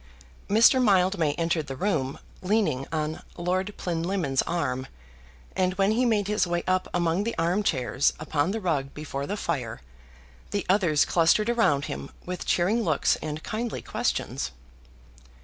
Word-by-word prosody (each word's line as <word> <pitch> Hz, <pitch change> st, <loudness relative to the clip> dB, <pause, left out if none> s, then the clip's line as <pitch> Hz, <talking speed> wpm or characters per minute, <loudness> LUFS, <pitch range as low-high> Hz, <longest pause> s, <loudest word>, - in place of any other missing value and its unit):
Mr. 230 Hz, +5 st, +6 dB
Mildmay 185 Hz, -7 st, +3 dB
entered 165 Hz, -1 st, -1 dB
the 135 Hz, -, -5 dB
room 140 Hz, -5 st, -1 dB, 0.2 s
leaning 185 Hz, -10 st, +1 dB
on 155 Hz, -1 st, -2 dB, 0.2 s
Lord 185 Hz, +3 st, -1 dB
Plinlimmon's 170 Hz, -5 st, 0 dB
arm, 130 Hz, -6 st, -1 dB, 0.7 s
and 185 Hz, 0 st, +1 dB
when 195 Hz, +1 st, +2 dB
he 245 Hz, +3 st, +2 dB
made 210 Hz, -4 st, +1 dB
his 210 Hz, -3 st, +1 dB
way 175 Hz, 0 st, -1 dB
up 185 Hz, 0 st, +1 dB
among 175 Hz, +2 st, +1 dB
the 230 Hz, +2 st, -3 dB
armchairs 165 Hz, -7 st, +1 dB
upon 155 Hz, +1 st, 0 dB
the 220 Hz, +3 st, -2 dB
rug 150 Hz, -8 st, -1 dB
before 140 Hz, -2 st, -5 dB
the 205 Hz, -, -3 dB
fire, 125 Hz, -, -3 dB, 0.7 s
the 205 Hz, -, -2 dB
others 170 Hz, -7 st, +3 dB
clustered 180 Hz, +9 st, +3 dB
around 150 Hz, -12 st, +2 dB
him 70 Hz, 0 st, -6 dB, 0.2 s
with 180 Hz, 0 st, -5 dB
cheering 200 Hz, +7 st, +2 dB
looks 155 Hz, -9 st, +2 dB
and 155 Hz, 0 st, -5 dB
kindly 230 Hz, +2 st, -3 dB
questions. -, -, -2 dB
175 Hz, 145 wpm, -26 LUFS, 150-200 Hz, 0.7 s, Mr